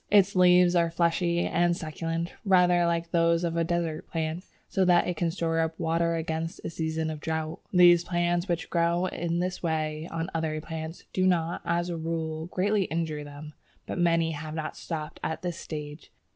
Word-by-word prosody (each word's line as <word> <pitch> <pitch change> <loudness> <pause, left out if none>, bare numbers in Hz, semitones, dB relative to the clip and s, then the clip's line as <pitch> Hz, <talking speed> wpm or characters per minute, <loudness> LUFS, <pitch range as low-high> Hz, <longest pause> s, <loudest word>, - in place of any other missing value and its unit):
Its 200 -1 +4
leaves 180 0 +6
are 170 -1 +3
fleshy 170 +1 +1
and 175 0 +2
succulent, 165 +2 -3
rather 180 -3 +4
like 170 0 -1
those 170 0 +3
of 170 -1 -1
a 170 - +2
desert 165 -2 -2
plant, 160 +1 -2 0.2
so 190 - +1
that 180 -1 +4
it 180 - -1
can 170 +1 0
store 165 -1 -1
up 160 0 -1
water 170 0 +1
against 160 0 -3
a - - -3
season 160 -1 -2
of 155 - -6
drought. 160 0 -3
These 175 -2 +7
plants 175 +1 0
which 175 -2 -2
grow 170 +1 +2
in 170 -2 -2
this 180 +1 -2
way 155 -1 -2
on 165 +2 -4
other 160 -1 -1
plants, 160 +1 -6
do 185 0 +2
not, 170 -2 +1
as 175 +1 0
a 170 - -3
rule, 160 0 -3
greatly 195 +2 +1
injure 160 -3 -2
them, 145 +1 -10 0.3
but - - -4
many 165 -1 +3
have 155 0 -6
not 155 -1 -4
stopped 155 -3 -6
at 160 - -3
this 175 -2 -3
stage. 150 0 -7
165 Hz, 185 wpm, -27 LUFS, 160-175 Hz, 0.3 s, These